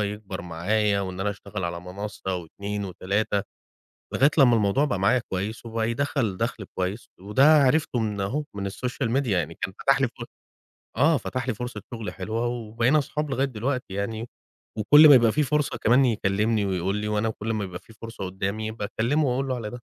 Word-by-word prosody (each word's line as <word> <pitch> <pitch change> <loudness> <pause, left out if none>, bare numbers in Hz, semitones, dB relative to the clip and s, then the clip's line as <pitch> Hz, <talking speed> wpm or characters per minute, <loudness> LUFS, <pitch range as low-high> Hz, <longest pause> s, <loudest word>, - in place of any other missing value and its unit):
يكبر 100 -3 -4
معايا 100 +5 0
وإن 95 -1 -5
أنا 105 +1 0
أشتغل 100 -1 -6
على 85 0 -3
منَصَّة 95 +1 -5
و2 100 +4 -5
و3، 100 +2 -1 0.7
لغاية 140 +2 +5
لمّا 125 -4 +6
الموضوع 110 +7 +2
بقى 100 -9 -1
معايا 115 +6 +3
كويس 105 +5 -3
وبقى 115 0 -1
يدخَّل 115 -6 -1
دَخْل 115 -2 -2
كويس 95 +5 -3
وده 105 +8 +1 0.2
عرفته 135 -2 +2
من 105 -3 -2
أهو، 135 +10 -1
من 100 -1 -3
الSocial 125 +2 -3
Media، 130 - -5
يعني 85 -5 0
كان - - -3
فتح - - +3
لي - - +3
ف - - -15 0.9
آه، 150 +3 +4
فتح 130 0 -4
لي 125 - +1
فُرصة 125 +3 -6
شُغل 115 -2 -5
حلوة 110 +5 -2
وبقينا 120 +4 +1
أصحاب 150 +1 -3
لغاية 135 +1 +1
دلوقتي 125 -2 -3
يعني 110 +4 -3 0.5
وكل 145 +9 +8
ما 140 - +10
يبقى 115 -3 +5
فيه 150 - +1
فرصة 150 +1 0
كمان 125 +4 +5
يكلِّمني 105 -1 +1
ويقول 95 +1 -1
لي 105 0 -3
وأنا 105 +1 0
كل 110 +1 -3
ما 105 - -1
يبقى 90 -2 -6
فيه 115 - -18
فُرصة 115 -3 -6
قُدّامي 100 +4 -3
باكلِّمه 115 +7 0
وأقول 135 +2 0
له 130 - -1
على 110 -3 -5
ده. 120 - -8
110 Hz, 190 wpm, -25 LUFS, 100-125 Hz, 0.9 s, ما